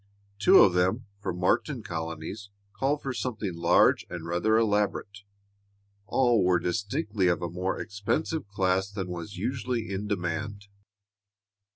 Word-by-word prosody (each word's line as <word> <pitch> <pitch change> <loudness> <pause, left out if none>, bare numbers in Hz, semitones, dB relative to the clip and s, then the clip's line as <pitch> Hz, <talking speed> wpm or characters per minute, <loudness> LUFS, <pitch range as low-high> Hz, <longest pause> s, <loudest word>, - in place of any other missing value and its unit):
Two 105 - +7
of 95 - +4
them, 95 +7 +1
for 95 -2 -3
martin 100 - 0
colonies, 85 +4 -5 0.2
called 145 +2 -1
for 135 - -2
something 110 -6 -3
large 85 +1 +4
and 85 -2 -6
rather 90 +6 +2
elaborate. 105 -1 0 0.9
All 120 -5 +3
were 90 0 +4
distinctly 105 - -1
of 85 -1 +1
a 85 - -3
more 90 +2 -2
expensive 105 +8 -2
class 95 -1 0
than 95 -3 -5
was 90 +3 -6
usually 120 0 -2
in 100 +2 -3
demand. 100 +2 -3
100 Hz, 135 wpm, -28 LUFS, 90-110 Hz, 0.9 s, Two